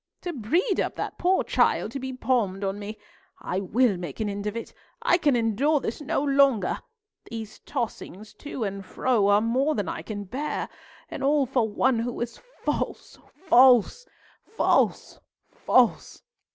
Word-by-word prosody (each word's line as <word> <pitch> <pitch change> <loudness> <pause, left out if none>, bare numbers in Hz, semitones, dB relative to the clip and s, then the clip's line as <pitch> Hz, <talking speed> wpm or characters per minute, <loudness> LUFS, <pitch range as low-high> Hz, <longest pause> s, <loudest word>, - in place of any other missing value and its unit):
To 350 - -4
breed 335 - 0
up - - -1
that - - -5
poor 370 +2 +2
child - - +1
to 275 - -5
be 265 0 -5
palmed 235 -7 -1
on 195 +1 -2
me! 210 +1 -7 0.4
I 185 - -3
will 205 +2 +2
make 175 -6 -7
an 215 -2 -1
end 200 +1 -4
of 210 +2 -3
it; 230 - -7 0.3
I 345 - +3
can 290 -6 +3
endure 240 +7 +2
this 240 +1 -5
no 285 -1 -1
longer! 275 -8 +3 0.5
These 220 -2 -7
tossings 215 -2 -5
to 285 -5 -5
and 195 -1 -4
fro 210 +2 +1
are 205 +1 +4
more 260 +7 +1
than 205 -3 -2
I - - -4
can 205 -2 -6
bear, 270 +10 -4 0.4
and - - -6
all 285 0 +3
for 245 -3 0
one 240 +3 +1
who 235 +1 -3
is 235 -1 -4 0.3
false, - - -3 0.3
false, 255 - +5 0.3
false, 445 - 0 0.3
false! - - +1
235 Hz, 165 wpm, -26 LUFS, 205-275 Hz, 0.5 s, false